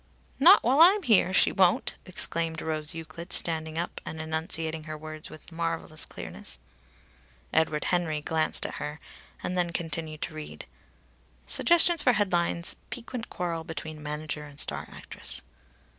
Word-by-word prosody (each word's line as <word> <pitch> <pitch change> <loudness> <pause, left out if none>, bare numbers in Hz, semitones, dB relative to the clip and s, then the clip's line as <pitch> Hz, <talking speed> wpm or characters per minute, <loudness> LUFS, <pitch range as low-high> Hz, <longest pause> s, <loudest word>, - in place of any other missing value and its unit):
"'" - - -34
"Not 350 +8 +8
while 260 +5 +3
I'm 385 +4 +7
here, 215 - +4
she 190 - +4
won't!" 185 -2 +3
exclaimed 165 -3 0
Rose 155 0 -2
Euclid 165 +2 -8
standing 160 -1 +3
up, 170 - -3
and 160 - -7
enunciating 160 0 -2
her 155 -1 -6
words 155 0 -6
with 155 - -13
marvellous 165 -1 -2
clearness. 60 - -7 1.0
Edward 155 -1 +2
Henry 170 -4 0
glanced 160 +1 +1
at - - -4
her, 150 +1 -5 0.4
and 180 - -2
then 175 -1 +1
continued 160 -2 -3
to 165 - -4
read: 155 -1 -8 0.8
"Suggestions 340 -1 +5
for 250 - +4
headlines. 175 -4 +1
'Piquant 245 -1 -6
quarrel 170 -2 -3
between 155 -1 -7
manager 150 0 -4
and 145 -1 -8
star - - -1
actress. 65 +1 -3
165 Hz, 145 wpm, -28 LUFS, 155-180 Hz, 1.0 s, Not